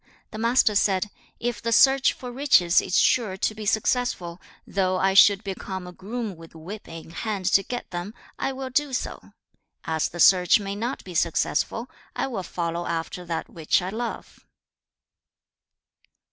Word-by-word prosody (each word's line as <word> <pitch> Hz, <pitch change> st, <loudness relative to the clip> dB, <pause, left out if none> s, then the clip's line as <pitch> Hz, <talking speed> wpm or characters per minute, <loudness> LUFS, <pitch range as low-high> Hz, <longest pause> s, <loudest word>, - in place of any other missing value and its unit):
The 215 Hz, -, -7 dB
Master 230 Hz, -1 st, +3 dB
said, 200 Hz, 0 st, +1 dB, 0.3 s
'If 240 Hz, -1 st, -3 dB
the 230 Hz, -, -2 dB
search 270 Hz, +3 st, +5 dB
for 250 Hz, -1 st, -8 dB
riches 240 Hz, -10 st, +4 dB
is 185 Hz, -, -1 dB
sure 215 Hz, -7 st, +2 dB
to 215 Hz, -, 0 dB
be 215 Hz, -1 st, -7 dB
successful, 215 Hz, -6 st, 0 dB, 0.2 s
though 185 Hz, -1 st, 0 dB
I 190 Hz, +1 st, +2 dB
should 200 Hz, +1 st, +6 dB
become 190 Hz, -1 st, -5 dB
a 180 Hz, -, -8 dB
groom 210 Hz, +2 st, -5 dB
with 165 Hz, 0 st, -14 dB
whip 185 Hz, +7 st, -9 dB
in 165 Hz, 0 st, -10 dB
hand 200 Hz, +1 st, -4 dB
to 195 Hz, -, +6 dB
get 245 Hz, +4 st, -6 dB
them, 175 Hz, +5 st, -5 dB, 0.2 s
I -, -, -1 dB
will 265 Hz, 0 st, -6 dB
do 285 Hz, +1 st, 0 dB
so. 255 Hz, -, -5 dB, 0.5 s
As 160 Hz, -1 st, -1 dB
the 175 Hz, -, -9 dB
search 180 Hz, +3 st, +6 dB
may 200 Hz, -1 st, -4 dB
not 240 Hz, +6 st, -4 dB
be 185 Hz, -, -9 dB
successful, 170 Hz, +7 st, 0 dB, 0.3 s
I -, -, -1 dB
will 240 Hz, -8 st, -4 dB
follow 170 Hz, -1 st, -3 dB
after 170 Hz, +2 st, -4 dB
that 165 Hz, -1 st, -3 dB
which 160 Hz, -2 st, +1 dB
I 180 Hz, -, -4 dB
love.' 230 Hz, +3 st, -5 dB
195 Hz, 165 wpm, -25 LUFS, 175-235 Hz, 0.5 s, should